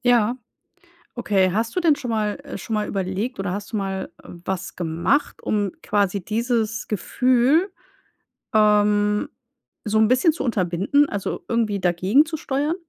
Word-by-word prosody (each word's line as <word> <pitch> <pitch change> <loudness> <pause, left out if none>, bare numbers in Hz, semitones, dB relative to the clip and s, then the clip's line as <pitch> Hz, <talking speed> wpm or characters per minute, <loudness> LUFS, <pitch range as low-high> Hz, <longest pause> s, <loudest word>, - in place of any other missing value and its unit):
Ja. 240 -1 +3 0.8
Okay. 195 -6 +2
Hast 225 +3 -1
du - - +2
denn 320 -4 +4
schon 250 -5 -5
mal 215 +1 -1
äh, 285 - -7
schon 225 - -5
mal 210 0 0
überlegt, 195 +6 -3
oder 195 -1 -2
hast 205 +2 -6
du - - -1
mal 195 -1 -3
was 180 +1 -6
gemacht, 170 - 0
um 205 -3 -1
quasi 200 -2 0
dieses 230 0 -1
Gefühl, 255 - +2 0.8
ähm, 210 -1 +3 0.5
so 215 0 0
'n 220 - +5
bisschen 255 +7 +4
zu 315 - -4
unterbinden, 210 +6 +1
also, 200 -2 -4
irgendwie 225 -4 0
dagegen 185 - +3
zu 315 0 -5
steuern? 290 +4 -1
215 Hz, 150 wpm, -22 LUFS, 195-250 Hz, 0.8 s, n